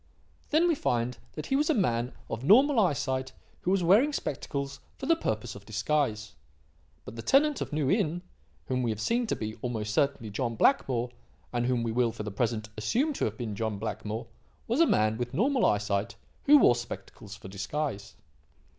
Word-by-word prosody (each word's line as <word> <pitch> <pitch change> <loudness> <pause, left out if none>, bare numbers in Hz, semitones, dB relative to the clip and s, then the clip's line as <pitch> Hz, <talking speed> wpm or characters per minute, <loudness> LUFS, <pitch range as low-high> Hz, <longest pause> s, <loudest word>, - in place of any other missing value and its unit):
"Then 320 +4 +4
we 340 - +3
find 120 - -1
that 155 - -6
he 270 - 0
was 295 +3 +2
a 315 - +3
man 120 - +1 0.2
of 115 - -5
normal 255 - +6
eyesight 135 -7 0 0.3
who - - -2
was 190 -1 +2
wearing 220 - +5
spectacles 140 - -4 0.2
for 270 - -6
the 330 +4 +4
purpose 110 - -3
of 100 - -11
disguise. 110 -1 -1 0.7
But - - -9
the - - -4
tenant 290 - +3
of - - -3
New 150 -2 0
Inn, 175 -4 0 0.4
whom 130 -1 -1
we 120 - 0
have 110 -1 -2
seen 235 - 0
to - - 0
be, 110 +1 -5
almost 110 -4 -3
certainly, 135 -6 0
John 115 +2 -2
Blackmore 125 - +2 0.4
and 120 0 0
whom 125 -2 +1
we 115 - -1
will, 120 0 +2
for 105 - -6
the 105 - -5
present, 110 +1 -1
assume 250 - 0
to - - -1
have - - -3
been 115 -5 -4
John 110 0 -2
Blackmore 110 +1 -4 0.4
was 235 +6 0
a 335 - +6
man 110 +1 +2
with 120 +1 -3
normal 255 - +3
eyesight 105 +1 0 0.3
who 295 +1 +8
wore 255 - +6
spectacles 110 -3 -8
for 105 - -11
disguise. 100 +2 -4
125 Hz, 190 wpm, -29 LUFS, -, 0.7 s, who